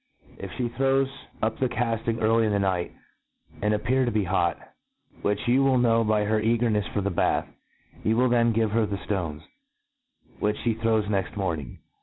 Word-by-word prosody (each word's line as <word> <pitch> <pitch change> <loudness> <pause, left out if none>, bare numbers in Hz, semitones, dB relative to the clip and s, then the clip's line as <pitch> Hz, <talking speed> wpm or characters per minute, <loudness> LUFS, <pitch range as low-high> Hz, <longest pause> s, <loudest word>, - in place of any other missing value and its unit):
If - - -6
(he 125 - -2
throws 135 +3 +1 0.4
up 110 - 0
the 130 - +1
cafting 115 -1 -1
early 115 +1 +3
in - - 0
the 100 - +2
night, 95 -3 0 0.7
and 105 - +1
appear 125 +5 +1
to 120 - +1
ht 105 -3 0
hotf 85 -2 +1 0.6
which 105 +2 -1
you 130 +3 +4
will 135 -1 +3
know 115 -2 +3
by 105 -1 +2
her 110 +1 +1
cagemefs 110 -2 +1
for 100 - -1
the 100 +1 -1
bath, 85 - +1 0.6
you 110 +1 +2
will 125 +1 +3
then 120 -1 +3
give 110 -1 +1
her 110 0 +2
the 100 0 -3
ftones,. 85 -8 -3 1.0
which 105 0 0
fhe 115 -1 0
throws 110 -2 +2
next 100 -2 -2
morning. 80 -10 -3
110 Hz, 185 wpm, -26 LUFS, 100-120 Hz, 1.0 s, you